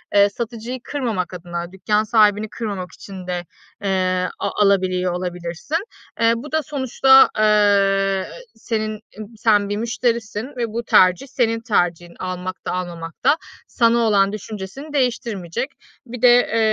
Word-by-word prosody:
eee, 200 0 +6
satıcıyı 235 +3 -5
kırmamak 225 -13 -3
adına, 175 0 -6
dükkân 210 +3 0
sahibini 215 -1 +3
kırmamak 200 -5 -5
için 185 0 -10
de, 175 -1 -3 0.4
eee, 185 -2 0
a - - -1
alabiliyor 185 -2 +2
olabilirsin. 180 - -3 0.4
Eee, 230 0 +4
bu 255 +6 -8
da 315 0 +1
sonuçta, 265 -1 +5
eee, 200 -2 +3 0.3
senin 215 -1 -3 0.2
eb - - -5 0.2
sen 205 -2 +3
bir 205 - -1
müşterisin 230 -1 -1
ve 235 -1 -1
bu 230 +2 -4
tercih 185 +3 +4
senin 230 -4 0
tercihin. 175 -6 0
Almak 185 0 -5
da - - -2
almamak 170 -2 -5
da 305 - +5 0.3
sana 235 -1 +3
olan 205 -4 +3
düşüncesini 215 +7 -7
değiştirmeyecek. 235 - -1 0.4
Bir 245 -1 -8
de, 250 - +7 0.2
eee, 230 - -1
205 Hz, 140 wpm, -21 LUFS, 185-230 Hz, 0.4 s, de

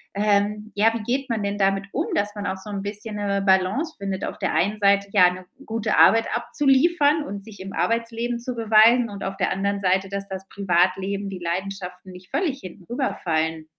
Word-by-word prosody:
ähm, 210 +1 0
ja, 220 +2 +3
wie 230 - -3
geht 260 +4 -1
man 225 -2 -1
denn 200 0 -2
damit 195 0 +1
um, - - -1
dass 205 +1 0
man 205 0 -5
auch 190 - -2
so 190 +2 -8
'n 200 -1 -4
bisschen 210 +1 -4
'ne 200 -1 -1
Balance 195 - +1
findet? 195 -2 -4
Auf - - -6
der - - -1
einen 205 +4 +1
Seite, 200 0 +3
ja, 185 -4 +6
'ne 180 0 -9 0.2
gute 220 -1 -1
Arbeit 225 0 +6
abzuliefern 295 +2 +2
und 200 -7 -7
sich 205 -2 -12
im 195 +1 -8
Arbeitsleben 230 +1 -1
zu 245 +1 -4
beweisen 230 +1 +5
und 200 -1 -7
auf 195 0 -4
der - - +1
anderen 200 +1 -1
Seite, 190 +1 +1
dass 200 0 -4
das 190 0 -6
Privatleben 195 +1 0
die 190 -2 -7
Leidenschaften 180 +1 -5
nicht 180 0 -13
völlig 300 -7 -1
hinten 185 0 -11
rüber 255 +3 -2
fallen? 160 -1 -1
200 Hz, 205 wpm, -23 LUFS, 190-225 Hz, 0.2 s, ja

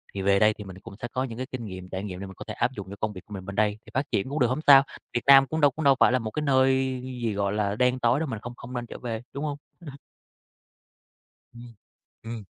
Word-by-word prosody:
thì 95 - -2
về 100 0 +3
đây 105 +1 +5
thì 105 - -9
mình 95 -2 -10
cũng 95 - -11
sẽ 120 - -3
có 130 - 0
những 115 -3 -7
cái 130 - -4
kinh 120 -3 -5
nghiệm, 95 -2 -8
trải 95 +1 -4
nghiệm 90 -3 -6
để - - -5
mình 95 - -10
có - - -9
thể - - -4
áp 120 +2 0
dụng 100 -5 -8
cho - - -6
công 110 -1 -1
việc 95 - -9
của 105 - -12
mình 95 -2 -7
bên 100 +1 -7
đây 105 0 +1
thì - - -14
phát 135 +2 +1
triển 100 +6 0
cũng 145 +3 -2
được, 125 - +4
hổng 130 +5 -1
sao. 135 -1 +9 0.3
Việt 120 - -1
Nam 135 0 +8
cũng 160 +2 -2
đâu 145 -2 +6
cũng 160 +2 -5
đâu 135 -1 +6
phải - - +6
là 130 - +2
một 110 -2 -5
cái 150 - -3
nơi 130 -1 +2
gì, 125 -4 -3
gọi 100 0 -1
là, 105 -1 0
đen 125 +2 +2
tối 120 +3 +2
đâu, 160 - -2
mình 115 -4 -4
không 120 0 -8
không 125 +1 -10
nên 120 -1 -3
trở - - -8
về, 115 -2 -4
đúng 140 +2 -4
hông? 145 -2 -3 0.2
Ừm. 165 - -8 1.7
Ừm, 120 -1 -12 0.5
ừm. 115 -2 -6
120 Hz, 295 wpm, -26 LUFS, 105-130 Hz, 1.7 s, sao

